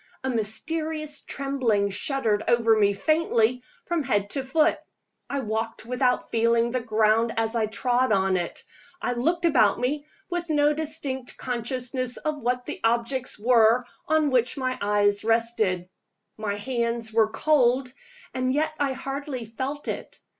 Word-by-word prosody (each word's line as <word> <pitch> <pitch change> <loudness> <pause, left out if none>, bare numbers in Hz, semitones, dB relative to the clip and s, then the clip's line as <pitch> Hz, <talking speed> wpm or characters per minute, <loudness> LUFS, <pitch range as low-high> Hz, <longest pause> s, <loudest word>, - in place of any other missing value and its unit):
A 265 - 0
mysterious 305 +7 -2
trembling 250 -8 0
shuddered 220 -1 0
over 230 -2 +4
me 205 -2 +4
faintly 250 -1 +1 0.2
from 345 -2 0
head 205 -6 0
to 275 - -1
foot. 305 +4 +2 0.5
I 280 -1 -1
walked 220 0 -3
without 250 +1 0
feeling 230 +1 +2
the 255 - 0
ground 220 0 +2
as 225 +1 0
I 220 -2 +1
trod 245 +3 +1
on 190 -2 +2
it; 175 -2 -3 0.4
I 245 - -1
looked 335 +9 0
about 215 -11 +4
me 285 +4 -1 0.2
with 350 -1 -3
no 295 -1 +3
distinct 295 -4 -3
consciousness 250 +1 -2
of 305 -1 -3
what 245 +1 -1
the - - -5
objects 235 +3 0
were 230 +1 +4 0.2
on 310 -2 +2
which 250 +2 +2
my 255 -1 -1
eyes 205 0 +2
rested. 225 -5 +1 0.5
My 210 -2 -3
hands 235 0 -2
were 220 -1 +4
cold 255 0 +2 0.4
and 255 0 0
yet 305 +3 0
I 280 -2 +1
hardly 270 -1 -5
felt 265 +6 -5
it. - - -5
245 Hz, 145 wpm, -25 LUFS, 220-275 Hz, 0.5 s, over